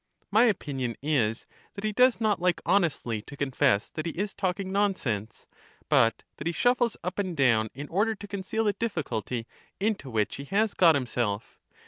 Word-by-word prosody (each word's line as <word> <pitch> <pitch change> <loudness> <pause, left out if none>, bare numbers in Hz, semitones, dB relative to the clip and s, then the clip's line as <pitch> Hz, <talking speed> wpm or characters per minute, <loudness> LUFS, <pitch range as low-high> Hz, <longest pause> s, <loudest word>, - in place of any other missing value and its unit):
My 220 +4 +6
opinion 135 - -1
is 125 -7 +1 0.3
that 200 - -7
he 215 - 0
does 250 +3 +4
not 215 -5 +1
like 175 -2 +2
honestly 165 - +1
to 140 - -12
confess 130 -7 +2
that 155 +1 -4
he - - -1
is 200 +3 -3
talking 190 0 -2
nonsense, 130 - -1 0.4
but 115 0 +3
that 150 - -4
he - - +1
112 - - -9
LACHES - - -5
shuffles 245 -2 +2
up 180 +3 -3
and 185 -5 -2
down 115 -5 +3
in 145 +3 -6
order 215 +5 +1
to 205 - -10
conceal 200 +2 -2
the 205 -2 +2
difficulty 125 - -3 0.3
into 200 -9 -1
which 110 -3 -1
he 140 - -7
has 205 +5 +1
got 165 -4 +5
himself. 120 -5 -2
170 Hz, 185 wpm, -27 LUFS, 125-205 Hz, 0.4 s, My